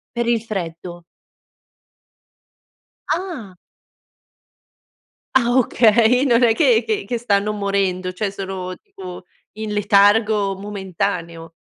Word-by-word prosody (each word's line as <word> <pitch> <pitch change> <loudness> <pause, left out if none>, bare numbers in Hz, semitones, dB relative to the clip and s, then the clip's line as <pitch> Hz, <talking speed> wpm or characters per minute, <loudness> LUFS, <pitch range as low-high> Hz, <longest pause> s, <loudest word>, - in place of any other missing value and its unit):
Per 235 0 -1
il 235 -2 +2
freddo. 175 -4 -6 2.1
Ah! 310 - -6 1.8
Ah 240 -2 +3
okay, 235 +2 +4
non 240 -1 +3
è 225 -2 +5
che 245 -7 +3
che 215 -2 -2
che 240 +2 -2
stanno 210 -2 0
morendo, 195 -3 -1
cioè 195 +2 -3
sono 190 -2 -6
tipo 180 -1 -11 0.3
in 215 0 -5
letargo 205 0 +3
momentaneo. 175 -4 -4
205 Hz, 100 wpm, -20 LUFS, 185-230 Hz, 2.1 s, è